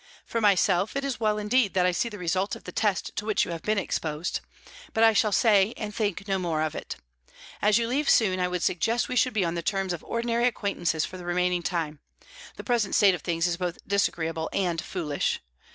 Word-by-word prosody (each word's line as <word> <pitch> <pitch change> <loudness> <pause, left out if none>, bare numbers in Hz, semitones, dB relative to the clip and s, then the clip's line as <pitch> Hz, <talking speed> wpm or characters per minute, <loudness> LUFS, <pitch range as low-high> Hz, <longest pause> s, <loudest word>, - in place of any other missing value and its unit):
For 230 - -2
myself, 200 0 +3
it 275 0 -1
is 270 -3 -3
well 215 -2 +1
indeed 210 0 +1
that 180 -1 +3
I 180 - +3
see 180 +7 -1
the 210 - -8
result 185 +2 -1
of - - -12
the - - -7
test 205 -4 -1
to - - -1
which 215 -1 +1
you - - -6
have 165 -1 -5
been 215 0 0
exposed. 160 -3 -2 0.6
But 225 - +3
I 225 0 +7
shall 215 0 +2
say 205 +1 +4
and 210 -2 -5
think 205 -1 -2
no 195 -1 0
more 165 -4 -1
of 155 - -2
it. - - -6 0.7
As 210 +1 +4
you 230 -1 0
leave 280 +4 0
soon, 190 -5 +4
I 180 - +1
would 180 -1 -3
suggest 225 +7 +1
that - - -7
we 255 - -2
should 255 +1 +3
be 205 -4 +1
on 165 - -1
the 170 - -2
terms 195 +1 -1
of 170 - -6
ordinary 235 +1 0
acquaintances 175 -8 -1
for 185 - -8
the 180 - -9
remaining 180 0 +1
time; 165 -4 -2 0.6
the - - -8
present 235 -5 0
state 200 -4 +6
of 175 - -4
things 165 -1 -1
is 175 -1 0
both 175 -1 -3
disagreeable 165 -5 0
and 175 -4 0
foolish. 155 -6 -2
195 Hz, 230 wpm, -26 LUFS, 175-215 Hz, 0.7 s, I